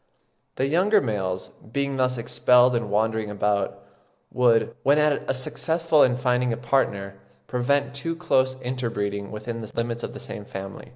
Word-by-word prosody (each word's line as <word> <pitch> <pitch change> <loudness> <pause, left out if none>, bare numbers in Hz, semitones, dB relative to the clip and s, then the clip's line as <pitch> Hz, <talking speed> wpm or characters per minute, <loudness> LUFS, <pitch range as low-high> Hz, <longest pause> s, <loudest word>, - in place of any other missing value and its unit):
The 130 - 0
younger 185 +9 +3
males, 95 - -2 0.2
being 140 +1 -1
thus 130 -1 +1
expelled 125 +1 +4
and 120 - -1
wandering 110 +1 0
about, 100 -1 -1 0.5
would, 115 -2 +3
when 140 +2 +4
at 150 -1 +1
last 130 0 0
successful 165 0 +1
in 125 -1 +4
finding 125 -1 +1
a 115 - -2
partner, 100 -6 -1 0.3
prevent 140 +1 0
too 165 +4 -3
close 130 -6 +1
interbreeding 105 -6 -3
within 115 +2 -6
the 110 - -8
limits 115 0 -2
of - - -6
the - - -7
same 105 - -6
family. 95 -1 -8
125 Hz, 160 wpm, -24 LUFS, 105-135 Hz, 0.5 s, expelled